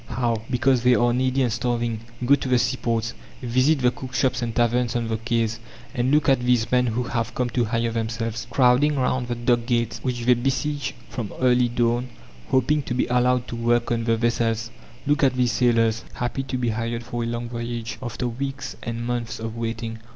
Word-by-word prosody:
How? 120 Hz, -2 st, -1 dB
Because 130 Hz, 0 st, +2 dB
they 125 Hz, 0 st, +5 dB
are 120 Hz, 0 st, +3 dB
needy 130 Hz, +1 st, +1 dB
and 120 Hz, -3 st, 0 dB
starving. 120 Hz, -2 st, -1 dB, 0.3 s
Go 135 Hz, -, +5 dB
to 135 Hz, -2 st, +1 dB
the 125 Hz, -, +4 dB
seaports, 115 Hz, -2 st, 0 dB, 0.3 s
visit 130 Hz, +4 st, +2 dB
the 125 Hz, -1 st, +4 dB
cook 130 Hz, +1 st, -8 dB
shops 125 Hz, 0 st, +1 dB
and 115 Hz, -1 st, -3 dB
taverns 120 Hz, 0 st, +1 dB
on 120 Hz, -1 st, 0 dB
the 110 Hz, -, 0 dB
quays, 115 Hz, -1 st, -1 dB, 0.3 s
and 125 Hz, -1 st, 0 dB
look 150 Hz, +2 st, +3 dB
at 135 Hz, -2 st, +4 dB
these 125 Hz, -2 st, +1 dB
men 125 Hz, 0 st, +3 dB
who 120 Hz, +2 st, -1 dB
have 120 Hz, -1 st, -3 dB
come 125 Hz, -1 st, -1 dB
to 120 Hz, 0 st, +1 dB
hire 115 Hz, +1 st, 0 dB
themselves, 115 Hz, 0 st, -3 dB
crowding 130 Hz, +4 st, +4 dB
round 130 Hz, -1 st, 0 dB
the 120 Hz, -, -2 dB
dock 120 Hz, 0 st, +1 dB
gates, 120 Hz, -2 st, 0 dB
which 125 Hz, -2 st, -2 dB
they 125 Hz, -, +6 dB
besiege 135 Hz, +3 st, -1 dB
from 115 Hz, -5 st, -5 dB
early 125 Hz, -1 st, +4 dB
dawn, 120 Hz, +1 st, +1 dB, 0.4 s
hoping 145 Hz, +4 st, +2 dB
to 125 Hz, -2 st, -4 dB
be 125 Hz, -, +2 dB
allowed 125 Hz, 0 st, +2 dB
to -, -, -4 dB
work 120 Hz, 0 st, +1 dB
on 115 Hz, -1 st, 0 dB
the 115 Hz, -1 st, +2 dB
vessels. 115 Hz, 0 st, 0 dB, 0.3 s
Look 145 Hz, +2 st, +2 dB
at 130 Hz, -2 st, +3 dB
these 125 Hz, -2 st, +2 dB
sailors, 115 Hz, -1 st, +2 dB
happy 120 Hz, +2 st, -2 dB
to 130 Hz, -, -3 dB
be 120 Hz, -2 st, 0 dB
hired 115 Hz, +2 st, -2 dB
for 120 Hz, 0 st, -4 dB
a -, -, -2 dB
long 120 Hz, 0 st, -3 dB
voyage, 115 Hz, -1 st, -5 dB
after 125 Hz, 0 st, -3 dB
weeks 135 Hz, +2 st, -4 dB
and 115 Hz, 0 st, -4 dB
months 120 Hz, -1 st, -3 dB
of 115 Hz, 0 st, -5 dB
waiting. 115 Hz, -1 st, -4 dB
120 Hz, 205 wpm, -24 LUFS, 115-125 Hz, 0.4 s, they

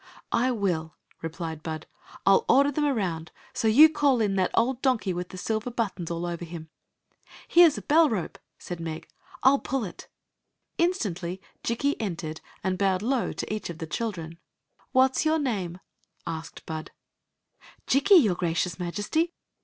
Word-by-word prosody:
" -, -, -46 dB
I 250 Hz, +2 st, +2 dB
will," 180 Hz, -, -1 dB, 0.3 s
replied 165 Hz, -1 st, -5 dB
Bud. 155 Hz, -1 st, -5 dB, 0.2 s
" -, -, -19 dB
I 195 Hz, -, +6 dB
'11 195 Hz, -, +4 dB
order 280 Hz, +2 st, +5 dB
them 295 Hz, +1 st, 0 dB
around. 180 Hz, -, -1 dB, 0.2 s
So 225 Hz, -, 0 dB
you 275 Hz, +9 st, +9 dB
call 290 Hz, -5 st, +2 dB
in 205 Hz, -3 st, +1 dB
that 185 Hz, -2 st, +2 dB
old 245 Hz, +2 st, +1 dB
donkey 240 Hz, -8 st, +1 dB
with 180 Hz, +1 st, -4 dB
the 185 Hz, -, -9 dB
silver 220 Hz, +5 st, -2 dB
buttons 205 Hz, -8 st, -3 dB
all 170 Hz, 0 st, -3 dB
over 175 Hz, 0 st, -4 dB
him." 165 Hz, -2 st, -8 dB, 0.4 s
" -, -, -41 dB, 0.3 s
Here 345 Hz, 0 st, +8 dB
s 300 Hz, -, -1 dB
a -, -, -6 dB
bell 315 Hz, +1 st, +5 dB
rope," 190 Hz, -8 st, -3 dB, 0.2 s
said 175 Hz, -1 st, -7 dB
Meg; 165 Hz, -1 st, -5 dB, 0.2 s
" -, -, -21 dB
I 260 Hz, -, +8 dB
11 280 Hz, 0 st, +2 dB
pull 270 Hz, -2 st, -2 dB
it" 180 Hz, -, -8 dB, 0.7 s
Instantly 190 Hz, -, -1 dB, 0.2 s
Jikki 280 Hz, +5 st, 0 dB
entered 165 Hz, -6 st, -4 dB, 0.2 s
and 185 Hz, 0 st, -1 dB
bowed 190 Hz, -1 st, +1 dB
low 250 Hz, 0 st, 0 dB
to -, -, -4 dB
each 215 Hz, -, -4 dB
of 170 Hz, -, -6 dB
the 165 Hz, -, -5 dB
children. 165 Hz, -2 st, -4 dB, 0.3 s
" -, -, -37 dB
What 260 Hz, 0 st, +4 dB
*s -, -, +2 dB
your 315 Hz, +1 st, +3 dB
name? 195 Hz, -, -2 dB, 0.3 s
" -, -, -51 dB
asked 160 Hz, 0 st, -6 dB
Bud 160 Hz, -1 st, -5 dB, 1.0 s
''Jikki, 340 Hz, +5 st, +6 dB
your 205 Hz, -5 st, +2 dB
gracious 175 Hz, 0 st, -1 dB
Majesty." 205 Hz, -, -1 dB
195 Hz, 185 wpm, -27 LUFS, 170-260 Hz, 1.0 s, you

